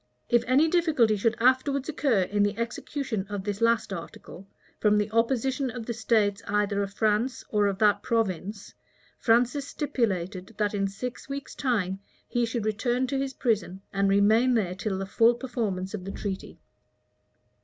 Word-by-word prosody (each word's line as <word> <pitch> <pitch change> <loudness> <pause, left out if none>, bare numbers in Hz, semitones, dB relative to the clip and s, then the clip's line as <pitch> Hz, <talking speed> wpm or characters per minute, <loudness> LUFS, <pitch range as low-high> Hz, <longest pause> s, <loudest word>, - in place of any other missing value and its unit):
If 240 -1 +4
any 275 +6 +4
difficulty 315 -10 +3
should 220 +2 0
afterwards 260 +3 +2
occur 275 -10 +1
in 205 +3 -1
the 205 +1 +1
execution 230 -2 -3
of 205 -2 -4
this 205 +1 -4
last 230 -3 +2
article, 180 +2 -9 0.3
from 210 -1 +3
the 210 0 0
opposition 255 +3 +1
of 240 -1 -6
the 235 - -3
states 215 -3 +1
either 205 0 +1
of 200 -1 -3
France 220 +4 +1
or 210 -1 +2
of 195 -1 -1
that 205 -1 +3
province, 205 -2 -2 0.5
Francis 250 +5 +2
stipulated, 205 - -2
that 210 -1 0
in 195 -1 0
six 245 +7 -6
weeks' 275 0 -5
time, 200 -8 -1 0.3
he 240 -1 0
should 225 -1 -3
return 240 +4 0
to 270 +1 -2
his 270 -1 -3
prison, 210 -6 -1
and 195 0 +2
remain 220 +6 +4
there 190 -6 0
till 195 0 -3
the 195 - -3
full 230 +4 +4
performance 220 -7 -3
of 200 -4 -5
the 195 - -5
treaty. 195 -2 -5
220 Hz, 165 wpm, -27 LUFS, 200-250 Hz, 0.5 s, If